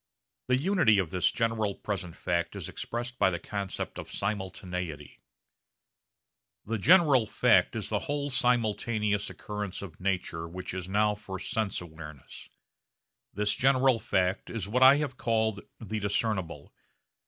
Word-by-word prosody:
The 125 0 +3
unity 165 - +4
of 90 -5 0
this 90 -1 +2
general 110 -3 0
present 95 -5 -4
fact 85 -1 -1
is - - -5
expressed 120 +1 -5
by - - +5
the 85 - -2
concept 100 +2 -5
of - - -8
simultaneity. 90 -6 -4 1.4
The 115 +1 -2
general 150 - +5
fact - - +3
is - - -3
the - - 0
whole 145 0 -2
simultaneous 110 -4 +1
occurrence 105 -2 -5
of 85 -5 -10
nature 90 -3 -2
which 90 +2 -6
is 95 -1 -5
now 105 +2 +3
for 100 -2 -7
sense 105 +2 -2
awareness. 80 -4 -11 0.8
This 105 +1 0
general 130 +1 +3
fact 95 -1 0
is 110 -5 -4
what 125 +5 0
I 130 +1 +9
have 145 -4 -3
called 110 -3 0 0.2
the 110 -1 -4
discernible. 100 -7 -2
105 Hz, 140 wpm, -29 LUFS, 90-115 Hz, 1.4 s, I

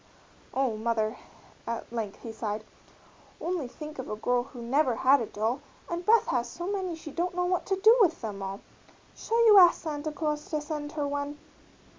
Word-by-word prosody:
"Oh, 260 -5 0
mother," 220 0 0 0.5
at 230 0 -4
length 215 -4 -4
he 230 - -5
sighed, 215 -1 -4 0.8
"only 340 -6 -2
think 300 +3 -9
of 260 - -5
a 215 - -2
girl 245 +3 +1
who 245 0 -11
never 250 +2 +1
had 265 +3 +4
a 225 - -3
doll, 225 +6 -1 0.3
and 345 +1 -3
Beth 450 +4 +5
has 240 -1 -1
so 345 +7 -6
many 380 -3 -2
she 320 -2 -9
don't 350 +3 -2
know 360 0 +1
what 360 0 0
to 385 - +2
do 435 +4 +7
with 340 -5 +4
them 205 -4 -5
all 195 +1 -5 0.5
shall 465 +1 +1
you 420 -3 +9
ask 350 -2 +7
Santa 305 -1 -3
Claus 300 -1 -3
to 310 - 0
send 295 0 -5
her 295 -2 -1
one?" 285 +1 -3
290 Hz, 195 wpm, -28 LUFS, 235-345 Hz, 0.8 s, you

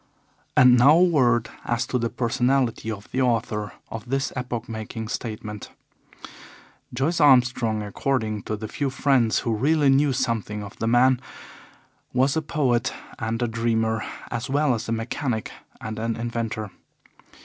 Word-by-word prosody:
And 125 -1 +7
now 140 +5 +7
a 175 - +6
word 125 -9 +2
as 120 -1 -1
to 125 - -1
the 115 0 -1
personality 120 -1 0
of 105 -2 -6
the 130 - 0
author 110 -4 0 0.2
of 115 +1 -7
this 135 +1 -1
epoch 125 -2 -4
making 110 0 -6
statement. 105 -3 -5 1.2
Joyce 160 +5 0
Armstrong, 125 -6 +4
according 110 0 -1
to 110 - 0
the 110 +1 -6
few 140 +5 -2
friends 130 -4 +2
who 115 - -1
really 145 +5 +3
knew 140 +1 +4
something 110 -5 -2
of 100 - -10
the 115 - -1
man, 125 +2 +4 0.9
was 130 +2 +2
a 160 - +1
poet 140 -7 0 0.3
and 115 +1 -2
a - - +1
dreamer, 115 -1 0 0.3
as 120 +1 -3
well 145 0 +2
as 115 0 -4
a - - -1
mechanic 115 +1 -2 0.3
and 110 0 -6
an 115 0 -1
inventor. 115 -3 -3
120 Hz, 150 wpm, -24 LUFS, 110-130 Hz, 1.2 s, And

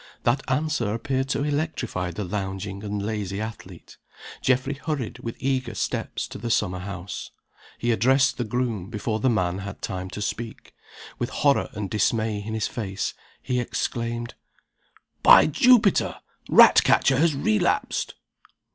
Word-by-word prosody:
That 130 +3 +2
answer 135 -6 0
appeared 135 +2 -2
to 140 - 0
electrify 145 - -2
the 90 +5 -5
lounging 95 +1 -4
and 105 -1 -3
lazy 105 -3 -3
athlete. 110 0 -8 0.4
Geoffrey 130 +2 +1
hurried, 140 -4 -4
with 115 - -5
eager 130 -4 -1
steps, - - -2
to - - -8
the 120 +2 -4
summer 95 -5 +1
house. 95 0 -6 0.5
He 120 - 0
addressed 130 +6 +3
the - - +1
groom 115 -4 -2
before 110 0 -2
the 130 - +2
man 90 -5 0
had 100 0 -7
time 95 0 -4
to 105 - -7
speak 115 +2 -5 0.5
With 120 - -1
horror 140 -1 +2
and 105 -3 -4
dismay 110 +1 0
in 110 +1 -4
his 110 - 0
face, 100 -4 -3 0.3
he 125 -1 0
exclaimed: 120 0 -3 0.9
"By - - +8
Jupiter! 215 - +4 0.3
Ratcatcher 135 -1 +6
has 160 -2 +3
relapsed!" 110 -6 0
115 Hz, 140 wpm, -25 LUFS, 100-130 Hz, 0.9 s, By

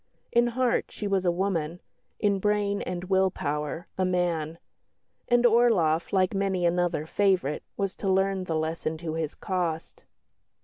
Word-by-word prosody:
In 240 0 +4
heart 255 -2 +2
she 210 - -7
was 195 -2 0
a 175 - +4
woman; 175 -3 -1 0.4
in 200 -1 +2
brain 205 0 +1
and 180 -1 -4
will 190 0 +2
power, 150 0 -3
a - - +3
man. 170 -3 0 0.7
And 240 0 +3
Orloff, 220 -9 +3
like 185 -1 +2
many 195 -2 0
another 175 -2 +1
favourite, 185 -5 +1 0.2
was 195 -1 -1
to 195 - -2
learn 190 0 +1
the 165 - -2
lesson 160 0 -2
to 160 -1 -5
his 160 -2 -3
cost. 170 -4 -3
185 Hz, 150 wpm, -27 LUFS, 165-200 Hz, 0.7 s, In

